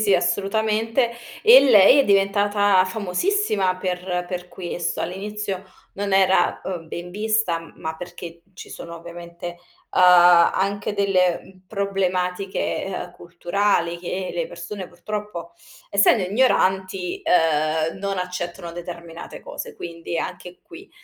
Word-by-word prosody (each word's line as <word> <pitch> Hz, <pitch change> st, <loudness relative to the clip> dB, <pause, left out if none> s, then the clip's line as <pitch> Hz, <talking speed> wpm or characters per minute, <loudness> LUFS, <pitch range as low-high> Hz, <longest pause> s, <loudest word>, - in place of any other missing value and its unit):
sì, 205 Hz, -2 st, +3 dB
assolutamente. 220 Hz, +6 st, 0 dB, 0.3 s
E 470 Hz, +3 st, +9 dB
lei 230 Hz, 0 st, +7 dB
è -, -, +2 dB
diventata 200 Hz, -1 st, +3 dB
famosissima 200 Hz, -, 0 dB
per 180 Hz, -1 st, -3 dB
per 180 Hz, -1 st, -5 dB
questo. 175 Hz, -1 st, -4 dB
All'inizio 195 Hz, 0 st, -4 dB, 0.3 s
non 200 Hz, 0 st, -3 dB
era, 190 Hz, -1 st, +3 dB
uhm, 170 Hz, -4 st, -5 dB
ben 175 Hz, +2 st, -7 dB
vista, 210 Hz, -5 st, -1 dB
ma 160 Hz, 0 st, -5 dB
perché 170 Hz, -1 st, -9 dB
ci -, -, -10 dB
sono 170 Hz, 0 st, -8 dB
ovviamente, 170 Hz, +1 st, -9 dB, 0.4 s
uhm, -, -, +2 dB
anche 180 Hz, +3 st, +5 dB
delle, 185 Hz, -3 st, +2 dB
mhmm, 185 Hz, -1 st, -18 dB
problematiche, 195 Hz, -2 st, -1 dB, 0.3 s
uhm, -, -, -23 dB
culturali 175 Hz, 0 st, -1 dB
che 185 Hz, +1 st, -4 dB
le -, -, -1 dB
persone 200 Hz, -, -7 dB
purtroppo 190 Hz, -1 st, -6 dB, 0.4 s
essendo 200 Hz, 0 st, +4 dB
ignoranti, 190 Hz, -4 st, +1 dB
uhm, 160 Hz, 0 st, +2 dB
non 195 Hz, 0 st, -3 dB
accettano 175 Hz, -2 st, -5 dB
determinate 170 Hz, -1 st, -9 dB
cose, -, -, -8 dB
quindi 170 Hz, 0 st, -5 dB
anche 180 Hz, 0 st, -6 dB
qui 355 Hz, +3 st, -14 dB
185 Hz, 120 wpm, -22 LUFS, 175-205 Hz, 0.4 s, E